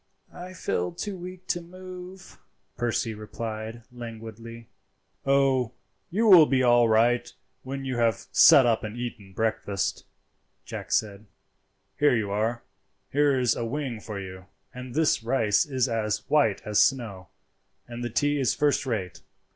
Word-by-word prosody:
"I 180 Hz, +1 st, -9 dB
feel 90 Hz, -, -2 dB
too 205 Hz, -2 st, -5 dB
weak 185 Hz, 0 st, -9 dB
to 175 Hz, -, 0 dB
move," 185 Hz, +1 st, -11 dB, 0.4 s
Percy 120 Hz, -1 st, -1 dB
replied 110 Hz, +1 st, -6 dB
languidly. 115 Hz, -1 st, -9 dB, 0.6 s
"Oh, 135 Hz, -3 st, +2 dB, 0.4 s
you 215 Hz, +6 st, 0 dB
will 180 Hz, -8 st, +8 dB
be 130 Hz, -1 st, +2 dB
all 120 Hz, -1 st, +5 dB
right 120 Hz, +2 st, +2 dB, 0.3 s
when 135 Hz, +1 st, -6 dB
you 130 Hz, -2 st, -3 dB
have 115 Hz, -3 st, +1 dB
sat 135 Hz, -, +7 dB
up 115 Hz, -2 st, +1 dB
and 105 Hz, +2 st, -6 dB
eaten 115 Hz, -5 st, -6 dB
breakfast," 100 Hz, -2 st, -2 dB, 0.6 s
Jack -, -, -7 dB
said 105 Hz, 0 st, -1 dB, 0.7 s
"Here 145 Hz, -3 st, +4 dB
you 105 Hz, -3 st, -1 dB
are; 110 Hz, +3 st, -1 dB, 0.5 s
here 145 Hz, -1 st, +3 dB
is 125 Hz, -2 st, +2 dB
a -, -, -3 dB
wing 125 Hz, -1 st, -3 dB
for 105 Hz, -1 st, -6 dB
you, 95 Hz, -1 st, -9 dB, 0.3 s
and 125 Hz, 0 st, -8 dB
this 155 Hz, -5 st, +2 dB
rice 115 Hz, 0 st, +1 dB
is 130 Hz, -3 st, 0 dB
as 110 Hz, -3 st, -2 dB
white 140 Hz, -10 st, +2 dB
as 105 Hz, -1 st, +3 dB
snow, 110 Hz, -9 st, 0 dB, 0.6 s
and 120 Hz, 0 st, -7 dB
the 120 Hz, -, -2 dB
tea 145 Hz, +5 st, +1 dB
is 130 Hz, -4 st, +1 dB
first 145 Hz, -2 st, +1 dB
rate. 95 Hz, -7 st, -3 dB
120 Hz, 145 wpm, -26 LUFS, 110-140 Hz, 0.7 s, will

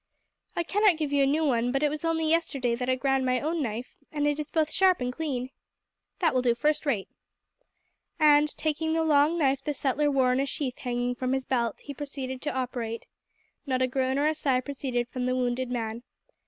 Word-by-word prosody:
"I 345 Hz, -, 0 dB
cannot 400 Hz, 0 st, +3 dB
give 300 Hz, -3 st, -2 dB
you 285 Hz, -, +3 dB
a -, -, +3 dB
new 310 Hz, +3 st, +2 dB
one, 245 Hz, -3 st, +1 dB
but 275 Hz, +2 st, 0 dB
it 295 Hz, -, +4 dB
was 305 Hz, +1 st, -4 dB
only 325 Hz, -1 st, 0 dB
yesterday 285 Hz, -7 st, +1 dB
that 250 Hz, +2 st, -2 dB
I 255 Hz, -, +3 dB
ground 270 Hz, 0 st, +1 dB
my 255 Hz, -1 st, +1 dB
own 320 Hz, +3 st, -1 dB
knife, 235 Hz, -1 st, -4 dB
and 295 Hz, -1 st, -1 dB
it 295 Hz, 0 st, +1 dB
is 300 Hz, -1 st, -4 dB
both 315 Hz, -1 st, +1 dB
sharp 375 Hz, -1 st, +4 dB
and 250 Hz, 0 st, -2 dB
clean." 260 Hz, -4 st, -3 dB, 0.7 s
"That 335 Hz, -3 st, +2 dB
will 255 Hz, -, +2 dB
do 240 Hz, -2 st, +2 dB
first 300 Hz, +5 st, 0 dB
rate." 215 Hz, -9 st, 0 dB, 1.1 s
And, 300 Hz, -1 st, +5 dB
taking 315 Hz, +1 st, -1 dB
the 325 Hz, 0 st, +1 dB
long 305 Hz, +1 st, +3 dB
knife 275 Hz, -3 st, +1 dB
the 295 Hz, -, -2 dB
settler 290 Hz, +2 st, +1 dB
wore 260 Hz, -3 st, +3 dB
in 255 Hz, -, +1 dB
a 275 Hz, -, 0 dB
sheath 265 Hz, -2 st, -3 dB
hanging 245 Hz, 0 st, -1 dB
from 255 Hz, +1 st, -2 dB
his 265 Hz, -1 st, -1 dB
belt, 235 Hz, -4 st, -1 dB
he 285 Hz, -, -7 dB
proceeded 270 Hz, -2 st, -5 dB
to 295 Hz, -, -2 dB
operate. 245 Hz, -3 st, -3 dB, 0.6 s
Not 255 Hz, -1 st, +1 dB
a -, -, +2 dB
groan 260 Hz, +1 st, 0 dB
or 285 Hz, -, +2 dB
a 310 Hz, -, +3 dB
sigh 270 Hz, -4 st, +1 dB
proceeded 255 Hz, -3 st, -3 dB
from 250 Hz, 0 st, -3 dB
the 255 Hz, -, +1 dB
wounded 250 Hz, 0 st, -1 dB
man. 230 Hz, -2 st, -3 dB
270 Hz, 220 wpm, -27 LUFS, 250-300 Hz, 1.1 s, And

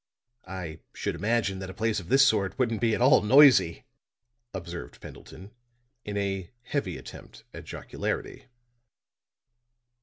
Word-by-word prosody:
"I 85 Hz, -4 st, -7 dB, 0.2 s
should -, -, -2 dB
imagine 105 Hz, -1 st, -1 dB
that 95 Hz, -1 st, -6 dB
a 95 Hz, -, -9 dB
place 110 Hz, -1 st, 0 dB
of 90 Hz, -2 st, -11 dB
this 135 Hz, +1 st, +6 dB
sort 100 Hz, -3 st, 0 dB
wouldn't 115 Hz, -4 st, 0 dB
be 115 Hz, -2 st, +2 dB
at -, -, 0 dB
all 130 Hz, +1 st, +6 dB
noisy," 130 Hz, -, +5 dB, 0.7 s
observed 85 Hz, -2 st, -8 dB
Pendleton, 95 Hz, +3 st, -12 dB, 0.5 s
in 105 Hz, 0 st, -5 dB
a 95 Hz, -3 st, -2 dB
heavy 110 Hz, -, -3 dB
attempt 65 Hz, -, -12 dB
at -, -, -9 dB
jocularity. -, -, -5 dB
100 Hz, 130 wpm, -27 LUFS, 95-115 Hz, 0.7 s, this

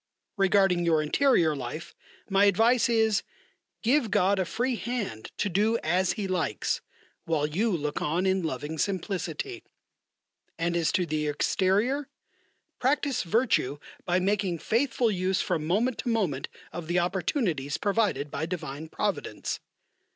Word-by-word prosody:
Regarding 195 Hz, -3 st, +3 dB
your 160 Hz, -2 st, +3 dB
interior 165 Hz, -, +3 dB
life, 140 Hz, +4 st, -6 dB, 0.3 s
my 195 Hz, 0 st, +4 dB
advice 225 Hz, +5 st, +4 dB
is: 220 Hz, -3 st, +3 dB, 0.6 s
Give 245 Hz, 0 st, +3 dB
God 200 Hz, 0 st, +3 dB
a 185 Hz, -, +1 dB
free 245 Hz, +7 st, -1 dB
hand 220 Hz, -, -4 dB
to -, -, 0 dB
do 210 Hz, +5 st, +2 dB
as 180 Hz, +3 st, +2 dB
He 205 Hz, -2 st, -3 dB
likes, 175 Hz, -, -1 dB, 0.4 s
while 155 Hz, -3 st, +1 dB
you 185 Hz, +10 st, 0 dB
look 150 Hz, -6 st, -2 dB
on 170 Hz, +5 st, 0 dB
in 190 Hz, 0 st, +2 dB
loving 155 Hz, 0 st, -4 dB
simplicity. 195 Hz, -, -2 dB, 0.9 s
And 170 Hz, +1 st, 0 dB
as 170 Hz, -1 st, +2 dB
to 180 Hz, -, +2 dB
the 155 Hz, -1 st, -1 dB
exterior: 205 Hz, -, +1 dB, 0.7 s
Practise 275 Hz, 0 st, +1 dB
virtue 190 Hz, -, +1 dB, 0.3 s
by 180 Hz, +1 st, +1 dB
making 195 Hz, -2 st, 0 dB
faithful 235 Hz, -, +1 dB
use 185 Hz, -1 st, 0 dB
from 155 Hz, -1 st, -1 dB
moment 225 Hz, +8 st, +1 dB
to -, -, -2 dB
moment 190 Hz, -, 0 dB, 0.3 s
of 175 Hz, -2 st, -6 dB
the 175 Hz, +2 st, 0 dB
opportunities 175 Hz, -, 0 dB
provided 200 Hz, -8 st, 0 dB
by 160 Hz, +3 st, -2 dB
divine 155 Hz, -3 st, -5 dB
Providence. -, -, -2 dB
185 Hz, 135 wpm, -27 LUFS, 160-220 Hz, 0.9 s, my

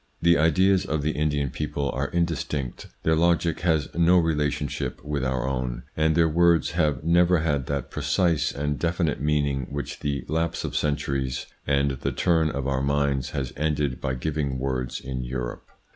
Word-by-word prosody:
The 85 Hz, 0 st, +5 dB
ideas 90 Hz, +5 st, +3 dB
of 75 Hz, -2 st, -2 dB
the 75 Hz, -, +1 dB
Indian 75 Hz, -3 st, 0 dB
people 70 Hz, -2 st, -2 dB
are 70 Hz, +2 st, -2 dB
indistinct, 80 Hz, -6 st, -2 dB, 0.2 s
their 80 Hz, -, +3 dB
logic 85 Hz, -1 st, +2 dB
has 80 Hz, -4 st, +1 dB
no 85 Hz, +2 st, +5 dB
rela 80 Hz, -3 st, +1 dB
tionship 75 Hz, 0 st, -4 dB
with 75 Hz, -2 st, -2 dB
our 65 Hz, -1 st, -1 dB
own, 65 Hz, -2 st, -2 dB
and 80 Hz, 0 st, +2 dB
their 85 Hz, -1 st, +4 dB
words 85 Hz, +1 st, +3 dB
have 75 Hz, -5 st, 0 dB
never 85 Hz, +2 st, +4 dB
had 70 Hz, -5 st, 0 dB
that 70 Hz, -1 st, -3 dB
precise 80 Hz, +3 st, +1 dB
and 75 Hz, 0 st, -2 dB
definite 85 Hz, -5 st, 0 dB
meaning 70 Hz, -3 st, 0 dB
which 70 Hz, 0 st, -5 dB
the 70 Hz, -1 st, -2 dB
lapse 80 Hz, +2 st, -1 dB
of -, -, -4 dB
centuries 70 Hz, -3 st, -1 dB, 0.2 s
and 70 Hz, 0 st, +2 dB
the 65 Hz, -, -3 dB
turn 80 Hz, -3 st, +2 dB
of 70 Hz, -3 st, -3 dB
our 65 Hz, -1 st, 0 dB
minds 70 Hz, -1 st, 0 dB
has 65 Hz, -3 st, -3 dB
ended 75 Hz, -3 st, -1 dB
by 65 Hz, -1 st, -1 dB
giving 70 Hz, 0 st, -2 dB
words 65 Hz, -1 st, -2 dB
in 65 Hz, -1 st, -5 dB
Europe. 60 Hz, 0 st, -5 dB
75 Hz, 175 wpm, -25 LUFS, 70-80 Hz, 0.2 s, The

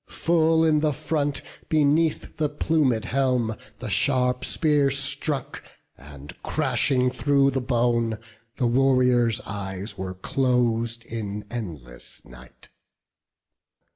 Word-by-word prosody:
Full 165 Hz, -1 st, +2 dB
in 155 Hz, -1 st, +3 dB
the 150 Hz, -1 st, +1 dB
front, 145 Hz, -1 st, -2 dB, 0.3 s
beneath 155 Hz, +1 st, +1 dB
the 150 Hz, -2 st, 0 dB
plumed 145 Hz, -7 st, +1 dB
helm, 125 Hz, -4 st, 0 dB, 0.2 s
The -, -, -6 dB
sharp 125 Hz, -2 st, +2 dB
spear 150 Hz, -3 st, +2 dB
struck, 135 Hz, +1 st, -1 dB, 0.3 s
and 70 Hz, 0 st, -12 dB
crashing 125 Hz, -2 st, +1 dB
thro' 140 Hz, +2 st, +2 dB
the 135 Hz, 0 st, -1 dB
bone, 120 Hz, -2 st, +1 dB, 0.4 s
The 130 Hz, -, 0 dB
warrior's 125 Hz, -2 st, +3 dB
eyes 100 Hz, 0 st, -6 dB
were 95 Hz, -1 st, -4 dB
clos'd 115 Hz, +1 st, 0 dB
in 105 Hz, -3 st, -5 dB
endless 75 Hz, -, -7 dB
night. 60 Hz, 0 st, -15 dB
125 Hz, 105 wpm, -24 LUFS, 110-145 Hz, 0.4 s, in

